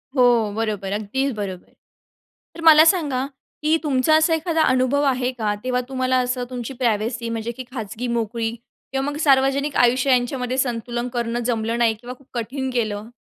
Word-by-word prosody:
हो, 240 -4 +4
बरोबर. 210 -3 -2
अगदीच 255 +7 -1
बरोबर. 190 -4 -6 0.8
तर 335 - -8
मला 315 -1 +9
सांगा, 295 -7 +2 0.4
की 310 +1 +3
तुमचा 285 +1 +3
असा 315 +1 +3
एखादा 325 0 0
अनुभव 260 +1 +2
आहे 250 0 -1
का 220 -4 -2
तेव्हा 250 0 0
तुम्हाला 255 -1 +1
असं 250 0 -1
तुमची 250 +1 -5
प्रायव्हसी 230 -1 -1
म्हणजे 230 0 -3
की 260 - -5
खाजगी 230 -1 -5
मोकळी 230 -1 -1 0.4
किंवा 270 0 -1
मग 290 - -5
सार्वजनिक 275 0 +2
आयुष्य 250 +2 +3
यांच्यामध्ये 250 0 0
संतुलन 240 -1 -2
करणं 235 -1 -1
जमलं 230 -1 -1
नाही 230 -2 +3
किंवा 245 +3 -9
खूप 275 - -23
कठीण 260 +3 -3
गेलं? 215 -3 -2
250 Hz, 165 wpm, -22 LUFS, 230-270 Hz, 0.8 s, मला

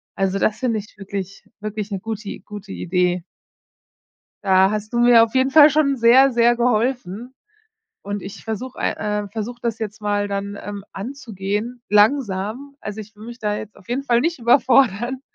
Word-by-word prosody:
Also, 195 0 0
das 215 - +1
finde 235 -4 0
ich 210 - -13
wirklich 195 -1 -6
wirklich 215 0 -5
'ne 195 - -2
gute 220 0 -6
I - - -7
gute 205 -1 -10
Idee. 180 -1 0 1.2
Da 190 0 +5
hast 215 +1 -4
du 235 - 0
mir 240 -1 +7
auf 230 - -9
jeden 260 +1 +3
Fall 300 +1 +8
schon 280 -2 +2
sehr, 255 +4 +6
sehr 240 -1 +3
geholfen 240 -1 -1 0.7
und 205 0 -4
ich 195 - -9
versuche 235 +3 -5
ei - - +1 0.3
äh, - - -8
versuche 225 +4 -6
das 230 -2 -2
jetzt 215 -1 -5
mal 205 0 0
dann, 200 0 -4
ähm, 205 -1 -7
anzugehen, 220 0 -5
langsam. 215 +3 +1
Also, 210 +1 -6
ich 215 0 -10
würde 215 +2 -12
mich 240 +1 -9
da 210 -2 -1
jetzt 215 0 -8
auf 185 - -19
jeden 255 +3 -1
Fall 240 -3 +2
nicht 335 -1 -1
überfordern, 245 0 +3
220 Hz, 180 wpm, -21 LUFS, 200-245 Hz, 1.2 s, Fall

